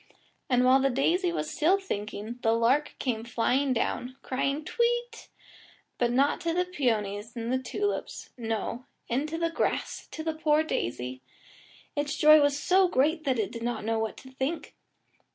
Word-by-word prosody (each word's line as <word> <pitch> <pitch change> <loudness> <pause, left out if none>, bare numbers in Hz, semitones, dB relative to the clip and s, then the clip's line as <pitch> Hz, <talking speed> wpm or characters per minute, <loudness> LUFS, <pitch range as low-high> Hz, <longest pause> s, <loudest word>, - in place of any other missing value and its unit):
And 250 -1 +3
while 260 +1 +6
the 270 0 +2
daisy 340 +8 +1
was 325 -3 -3
still 360 +6 +3
thinking, 215 - -5
the 225 - +3
lark 245 +6 +2
came 230 -4 -2
flying 250 +4 +1
down, 250 +1 -1
crying 275 +3 -1
"Tweet," 480 +3 -1 0.7
but 240 -1 +2
not 275 +4 +2
to 335 -1 -1
the 360 0 +2
peonies 225 - -1
and 245 +3 -2
tulips 410 +8 -3
no, 230 +1 -3 0.2
into 300 +7 -1
the 335 0 0
grass - - -2
to 315 - -6
the 320 0 -1
poor 310 -1 +2
daisy. 125 - -3 0.7
Its 290 0 -1
joy 305 0 +8
was 285 0 +2
so 370 +4 +4
great 310 +1 +1
that 260 -3 +1
it 215 -4 -1
did 230 - -7
not 235 -2 -3
know 225 0 0
what 220 0 -3
to 260 - -12
think. 265 +5 -3
265 Hz, 165 wpm, -28 LUFS, 235-315 Hz, 0.7 s, joy